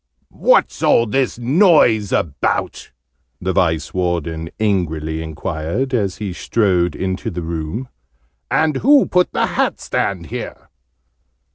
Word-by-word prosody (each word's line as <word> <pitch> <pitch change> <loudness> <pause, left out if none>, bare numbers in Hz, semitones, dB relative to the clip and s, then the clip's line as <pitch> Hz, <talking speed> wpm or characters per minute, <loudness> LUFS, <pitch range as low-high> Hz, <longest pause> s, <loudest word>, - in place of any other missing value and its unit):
"What's - - +4
all 115 - +4
this 130 +2 -1
noise 125 - +4
about?" 70 -5 -1 0.5
the 95 +1 -2
Vice 80 -5 0
warden 85 -3 -2
angrily 80 -7 -1
enquired, 80 - -3
as 100 -6 0
he 100 -4 -4
strode 90 -5 +1
into 95 +4 -3
the 90 -3 -5
room. 80 +9 -4 0.6
"And 155 -3 +1
who 280 - +5
put 180 0 +1
the - - +1
hat - - -1
stand 90 -4 -2
here?" - - -7
95 Hz, 120 wpm, -19 LUFS, 80-120 Hz, 0.6 s, who